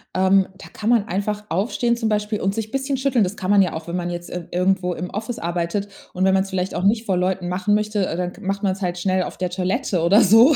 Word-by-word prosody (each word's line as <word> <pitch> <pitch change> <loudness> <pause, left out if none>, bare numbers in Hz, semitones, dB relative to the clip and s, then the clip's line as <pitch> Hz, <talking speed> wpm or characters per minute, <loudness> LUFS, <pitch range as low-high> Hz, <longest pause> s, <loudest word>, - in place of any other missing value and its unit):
Ähm, 190 +1 +4
da - - -11
kann 215 - -3
man 230 -4 +4
einfach 210 +1 -2
aufstehen 235 +6 0
zum 225 -2 -1
Beispiel 210 0 0
und 195 +1 -1
sich 220 -1 -4
bisschen 270 0 -1
schütteln. 260 -4 +2
Das 185 +3 -4
kann 185 +1 -2
man 205 -1 +6
ja 180 - +1
auch, 160 +1 -6
wenn 170 - -3
man 175 0 -2
jetzt, 175 0 -6
äh, 175 -1 -5
irgendwo 180 0 +1
im 180 +2 -5
Office 220 +3 -4
arbeitet. 175 +4 -2 0.2
Und 185 - -1
wenn 190 0 +4
man's 190 0 +1
vielleicht 185 -1 -2
auch 180 - -2
nicht 220 +3 +2
vor 190 -2 +1
Leuten 180 0 -1
machen 190 +3 +1
möchte, 210 -1 0
dann 180 0 -2
g 210 - -15
macht 195 +1 -2
man's 195 0 0
halt 180 -1 -1
schnell 185 0 +1
auf - - -7
der 180 -1 -1
Toilette 185 +2 -1
oder 190 +7 +5
so. 230 - +7
195 Hz, 260 wpm, -22 LUFS, 180-210 Hz, 0.2 s, so